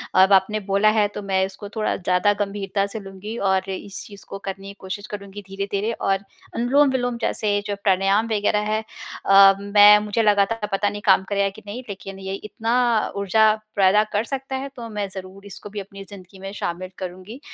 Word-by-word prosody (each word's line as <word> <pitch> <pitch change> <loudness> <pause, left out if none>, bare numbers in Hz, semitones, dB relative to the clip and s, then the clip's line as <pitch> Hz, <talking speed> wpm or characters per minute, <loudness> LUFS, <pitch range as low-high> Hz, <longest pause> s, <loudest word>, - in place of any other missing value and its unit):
अब 190 +1 +6
आपने 195 +3 +3
बोला 200 +2 +4
है, 215 -1 +3
तो 205 0 -7
मैं 190 -1 0
इसको 195 +2 -9
थोड़ा 215 -1 0
ज़्यादा 180 +3 +2
गम्भीरता 200 0 -2
से 215 +2 -6
लूँगी, 195 +3 -8
और 190 -1 0
इस 195 +1 -6
चीज़ 200 -2 -13
को 195 - -5
करने 195 0 -7
की 200 - -8
कोशिश 200 +2 -6
करूँगी 200 0 -8
धीरे-धीरे। 200 +2 -2
और 195 -3 0 0.4
अनुलोम-विलोम 245 0 +2
जैसे 205 -1 0
जो 205 - -2
प्राणायाम 195 +2 +2
वगैरह 210 0 +1
हैं, 220 +1 0 0.4
अ, 195 0 +8
मैं 205 +1 +7
मुझे 210 +2 0
लगा 205 -1 +4
था 225 -2 -2
पता 205 +1 +1
नहीं 205 0 -7
काम 190 -1 +5
करेगा 200 -1 +1
कि 215 +3 -14
नहीं, 210 +5 -6
लेकिन 195 -1 -8
ये 190 0 -5
इतना 230 +2 0
ऊर्जा 215 +2 +3 0.2
पैदा 200 +2 +5
कर 205 +2 +1
सकता 270 +1 -4
है, 270 +1 -4
तो 235 -2 -7
मैं 210 -2 -3
ज़रूर 190 +1 -10
इसको 200 +1 -10
भी 205 +1 -6
अपनी 195 0 -9
ज़िन्दगी 195 -1 -13
में 195 +1 -7
शामिल 185 -2 -4
करुँगी। 185 +6 -8
200 Hz, 195 wpm, -22 LUFS, 195-215 Hz, 0.4 s, अ